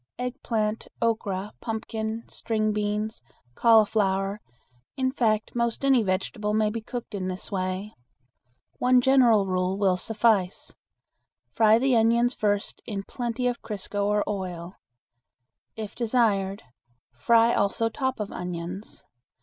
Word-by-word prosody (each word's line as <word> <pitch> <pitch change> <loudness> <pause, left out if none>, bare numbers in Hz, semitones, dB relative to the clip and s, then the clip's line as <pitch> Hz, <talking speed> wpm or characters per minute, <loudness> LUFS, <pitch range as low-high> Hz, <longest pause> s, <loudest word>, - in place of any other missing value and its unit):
Eggplant, 225 -3 -2
okra, 210 -3 -1
pumpkin, 220 0 -4
string 215 -1 -1
beans, 210 +1 -2 0.3
cauliflower, 205 - +3 0.6
in 260 -1 +1
fact 220 -5 0
most 235 +2 -1
any 265 -3 +5
vegetable 210 +2 -1
may 215 -1 +2
be 230 +1 -4
cooked 235 0 -7
in 190 -2 -3
this 185 +3 -5
way. 185 +2 -3 0.9
One 250 0 +5
general 245 -5 +5
rule 185 0 0
will 190 -3 +2
suffice: 210 -3 +1 0.8
Fry 220 -1 +5
the 260 +1 +2
onions 235 +2 +3
first 205 -3 -1
in 200 -3 -4
plenty 240 +2 -3
of 245 -1 -1
crisco 205 -1 -3
or 210 0 +2
oil. 185 -3 -4 1.0
If 215 -2 -6
desired, 215 -4 +1 0.5
fry 230 - +4
also 200 +3 +1
top 260 +2 -2
of 210 -1 -4
onions. 180 +3 -6
215 Hz, 120 wpm, -26 LUFS, 195-230 Hz, 1.0 s, any